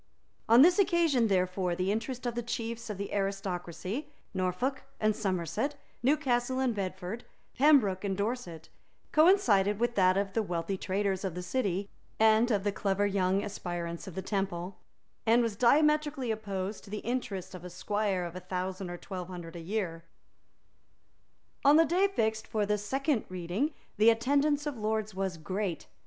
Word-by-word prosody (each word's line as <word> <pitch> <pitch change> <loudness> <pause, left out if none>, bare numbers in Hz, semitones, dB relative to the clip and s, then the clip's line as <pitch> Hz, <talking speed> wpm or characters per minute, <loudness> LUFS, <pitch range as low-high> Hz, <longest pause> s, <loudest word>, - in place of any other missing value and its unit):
On 235 +4 +9
this 355 +5 +5
occasion 335 - +3
therefore 185 -2 +1
the 185 +2 0
interest 245 +4 -3
of 240 - -1
the 240 - -2
chiefs 230 0 -4
of 210 - -4
the 200 0 -5
aristocracy, 195 - -3 0.2
Norfolk 190 +9 -1 0.2
and 215 -1 +2
Somerset, 195 - -1 0.3
Newcastle 260 -2 +1
and 260 -3 +1
Bedford, 195 +2 -4 0.3
Pembroke 250 -10 +4
and 195 -2 -1
Dorset, 200 -7 -3 0.4
coincided 225 - +4
with 240 0 +1
that 185 -3 +4
of 195 0 -1
the 225 - +2
wealthy 175 -1 -2
traders 195 0 -1
of 185 -4 -3
the 180 - -4
City 195 -2 -1 0.3
and 220 +2 +5
of 205 -4 +1
the 205 - +1
clever 200 0 0
young 195 -1 +1
aspirants 175 -4 -5
of 185 - -8
the 190 - -4
Temple, 190 -2 -2 0.5
and 235 +2 +5
was 225 -3 -1
diametrically 295 +1 +3
opposed 200 -2 -4
to 200 - -13
the 210 +1 -5
interest 190 -7 -4
of 180 -1 -9
a 180 - -7
squire 195 0 -1
of 170 0 -7
a - - -4
thousand 185 +1 -4
or 175 - -5
twelve 180 -1 -6
hundred 175 -2 -8
a - - -6
year. 170 -2 -3 1.6
On 285 +1 +7
the 325 +1 +6
day 365 +5 +3
fixed 220 - -1
for 215 -2 0
the 210 0 0
second 270 +4 0
reading 185 - -2 0.3
the 215 +2 +6
attendance 285 +5 +2
of 290 -6 -4
lords 215 0 -1
was 190 -2 -2
great. 185 +1 -3
205 Hz, 165 wpm, -30 LUFS, 185-240 Hz, 1.6 s, On